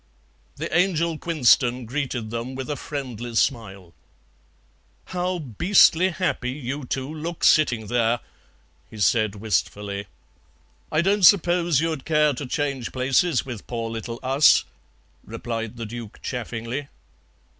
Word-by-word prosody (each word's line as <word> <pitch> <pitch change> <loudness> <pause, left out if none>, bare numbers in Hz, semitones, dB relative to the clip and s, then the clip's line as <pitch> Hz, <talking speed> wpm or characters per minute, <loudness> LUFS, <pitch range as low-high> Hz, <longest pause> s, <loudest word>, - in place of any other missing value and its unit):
The - - -4
Angel 170 -3 +1
Quinston 125 -6 +3
greeted 125 -3 -3
them 120 +3 -4
with 135 +2 -4
a - - -1
friendly 120 -6 -6
smile. 100 - -1 1.1
"How 180 0 -2
beastly 170 - +4
happy 175 -8 -2
you 135 +1 -5
two 130 +1 -3
look 165 +2 -6
sitting 125 -8 +4
there!" 120 +1 +1 0.7
he 110 - -12
said 105 +1 +2
wistfully. 100 0 -2 0.8
"I 155 - +2
don't 200 +3 +2
suppose 175 -4 +5
you'd 160 -4 -2
care 150 -2 +3
to 135 +1 -6
change 140 -3 -2
places 130 +4 +1
with 120 -6 -8
poor 115 -2 -4
little 115 +1 -6
us," 135 +3 +5 0.6
replied 115 -1 -5
the 115 - -5
Duke 115 -1 -8
chaffingly. 120 +2 -4
130 Hz, 125 wpm, -24 LUFS, 115-155 Hz, 1.1 s, suppose